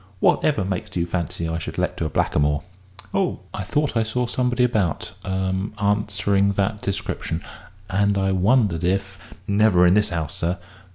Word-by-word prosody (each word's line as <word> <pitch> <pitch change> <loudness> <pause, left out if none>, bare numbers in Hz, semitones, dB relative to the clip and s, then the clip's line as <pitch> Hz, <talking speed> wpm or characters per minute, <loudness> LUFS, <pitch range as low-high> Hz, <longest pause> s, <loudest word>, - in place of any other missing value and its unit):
Whatever 125 -5 +3
made 95 +2 -4
you 85 -1 +1
fancy 85 -1 -3
I 80 0 -2
should - - -6
let - - 0
to - - -1
a - - -1
blackamoor?" 75 +1 +1 0.5
"Oh, - - 0
I - - -4
thought 145 +9 0
I 115 - +3
saw 110 +3 0
somebody 125 0 +1
about 110 -9 0
er 95 0 -1 0.3
answering 100 -1 +2
that 100 +2 -1
description, 85 -4 -3 0.4
and 100 +1 +2
I 95 0 +1
wondered 95 -2 +2
if 95 +1 -1 0.2
" - - -27
"Never 100 -3 +4
in 90 - +6
this 105 -1 +3
'ouse, 80 -4 -2
sir. 85 +3 -1
100 Hz, 170 wpm, -23 LUFS, 90-105 Hz, 0.5 s, in